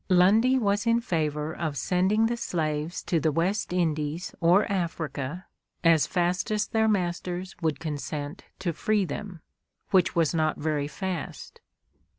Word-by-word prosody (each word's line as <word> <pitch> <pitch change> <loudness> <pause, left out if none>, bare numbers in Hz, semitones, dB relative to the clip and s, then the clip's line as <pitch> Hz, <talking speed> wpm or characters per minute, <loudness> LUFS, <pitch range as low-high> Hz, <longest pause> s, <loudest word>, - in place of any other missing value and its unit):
Lundy 210 +8 +5
was 205 -2 +1
in 230 0 +4
favor 155 -7 -1
of 155 -4 -3
sending 190 +9 +2
the 235 +1 0
slaves 155 -6 -2
to 170 - +1
the 155 +1 +1
West 180 +8 0
Indies 160 -1 -1
or 175 +5 +5
Africa 165 -3 -3 0.4
as 165 -3 +5
fast 180 0 0
as 215 0 +1
their 220 0 +2
masters 180 -2 -1
would 160 -3 0
consent 150 -2 -5
to 175 -3 -2
free 205 +4 +1
them, 180 +2 -6 0.5
which 190 -1 +3
was 165 -2 +2
not 155 -1 +1
very 150 -1 -1
fast. 180 +4 -5
175 Hz, 145 wpm, -27 LUFS, 155-195 Hz, 0.5 s, Lundy